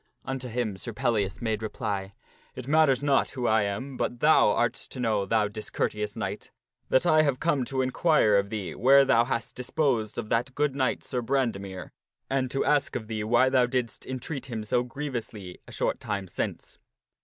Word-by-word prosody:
Unto 135 -1 -3
him 115 -4 -2
Sir 115 +4 -6
Pellias 105 -1 -1
made 110 -2 -1
reply, 105 -3 -4 0.2
" - - -32
It 130 -1 -7
matters 145 -3 +3
not 140 -2 +3
who 125 -3 -4
I 110 -1 +4
am, 125 +7 -3
but 120 - -2
thou 150 -6 +5
art 120 +3 +2
to 130 - -9
know, 110 -5 0
thou 110 0 +2
discourteous 105 0 -3
knight, 105 -2 -5 0.4
that 130 - +3
I 155 -2 +5
am 140 -4 +2
come 140 -2 0
to 130 +1 -1
inquire 130 - +3
of 100 0 +2
thee 100 -7 -4
where 135 +3 +6
thou 120 -3 +4
hast 115 -2 -3
disposed 125 -4 -1
of 110 -2 -4
that 125 +3 0
good 145 -2 0
knight 130 -2 0
Sir 125 -2 -3
Brandemere, 110 -8 -2 0.4
and 130 -1 +1
to 135 - -1
ask 145 -1 +2
of 110 - -3
thee 110 -1 -2
why 120 +4 +4
thou 130 -2 +3
didst 125 -2 -3
entreat 130 +2 -5
him 115 -4 -4
so 120 +3 +1
grievously 120 -8 -6
a - - -11
short - - -1
time 100 -2 -3
since." - - -5
120 Hz, 190 wpm, -27 LUFS, 105-135 Hz, 0.4 s, where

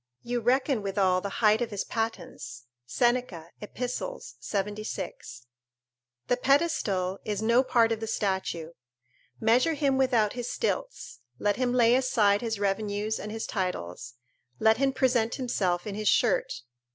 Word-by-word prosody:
You 240 0 -1
reckon 255 +1 +1
withal 195 -2 +1
the 200 - -4 0.2
height 215 +2 +5
of 240 - -1
his 205 -2 -3
pattens." 175 - -5 0.2
[Seneca, 240 - 0
Ep. 210 - -10
76.] 205 - -5 0.8
The 245 - +2
pedestal 220 - +1
is 210 0 -3
no 235 +3 +4
part 235 -3 +3
of 225 - -1
the 225 - -4
statue. 190 -6 -2 0.7
Measure 245 +8 +3
him 275 -3 +1
without 240 -6 +2
his 245 -1 -4
stilts; - - -3 0.2
let 205 -1 0
him 250 -1 +1
lay 240 -1 +4
aside 215 -6 +3
his 225 -3 -3
revenues 205 +2 -1
and 210 - -6
his 220 0 -4
titles; 120 - -4 0.4
let 220 0 +4
him 270 +1 +2
present 245 -4 +1
himself 190 -9 -1
in 210 - -4
his 215 +1 -3
shirt. - - +2
220 Hz, 140 wpm, -28 LUFS, 195-250 Hz, 0.8 s, height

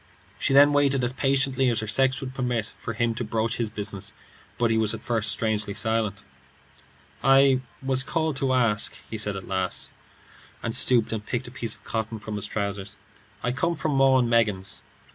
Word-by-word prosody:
She - - 0
then 145 +2 +7
waited 140 -2 +2
as 125 +1 +1
patiently 135 -1 +1
as 115 -2 0
her - - -3
sex 130 +4 +1
would 130 -1 -6
permit, 125 -5 -2
for 115 - -6
him 120 0 +1
to 120 - -3
broach 115 +1 -1
his 115 -2 -1
business, 105 -2 -5 0.4
but 120 -1 +2
he 110 - +2
was 110 -1 +3
at - - -11
first 115 -3 +2
strangely 105 0 -1
silent. 110 -2 -1 1.0
"I 135 -1 +5 0.2
was 130 -1 +1
asked 135 - -8 0.3
to 135 - 0
call," 120 -5 +2 0.3
he 110 - -3
said 105 -1 -1
at 95 - -7
last, 95 -1 -2 0.7
and 115 0 -1
stooped 120 -3 +4
and 110 -2 -3
picked 120 +2 -3
a - - -15
piece 115 -3 -2
of - - -22
cotton 110 0 -3
from 110 0 -6
his 105 - -3
trousers. 100 -1 -4 0.5
"I 125 - +1
come 170 +7 0
from 155 0 -2
'Maw 135 -1 +4
and 125 -2 +2
Meggins.'" 105 -5 0
115 Hz, 195 wpm, -25 LUFS, 105-130 Hz, 1.0 s, then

